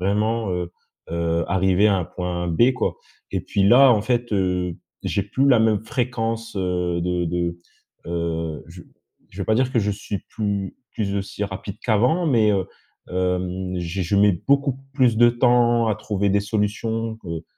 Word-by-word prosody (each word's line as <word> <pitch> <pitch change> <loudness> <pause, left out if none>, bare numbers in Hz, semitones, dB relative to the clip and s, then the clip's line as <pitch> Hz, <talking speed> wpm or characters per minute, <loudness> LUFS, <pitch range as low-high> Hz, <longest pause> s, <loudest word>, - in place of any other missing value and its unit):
vraiment, 105 +3 0
heu 90 -1 -3 0.4
heu, 85 0 0
arriver 95 +2 +3
à 100 - +3
un 90 - -1
point 90 0 -4
B, 120 +10 +4
quoi» 130 - -1 0.4
et - - 0
puis, 100 - 0
là, 125 +6 +7
en 110 - +2
fait, 120 -1 -1
heu, 90 -3 0 0.3
j'ai 100 - -1
plus 130 +7 +1
la 125 -4 +6
même 110 -1 +2
fréquence, 115 -1 -2
heu, 90 -2 -1
de 90 0 -1
de, 85 0 -2 0.5
heu, 85 -2 -3
je 85 +1 -11 0.5
je - - -14
vais - - -3
pas 110 - +2
dire 130 +1 +1
que 115 - +2
je 105 0 0
suis 100 0 -4
plus 100 -3 -3 0.2
plus 100 -2 -2
aussi 100 +1 -3
rapide 95 0 -6
qu'avant. 125 - +2
Mais, 115 -7 +3
heu, 95 -2 0 0.4
hem, 90 0 -2
j'ai 90 +2 -3
je 90 +3 0
mets 100 0 +5 0.2
beaucoup 140 -1 +2 0.2
plus 125 -5 +3
de 120 +1 +6
temps 120 -1 +3
à 110 - +2
trouver 100 -2 -1
des 100 +1 +3
solutions 110 +2 -2
que 95 - -12
heu, 85 0 -5
100 Hz, 180 wpm, -22 LUFS, 90-115 Hz, 0.5 s, là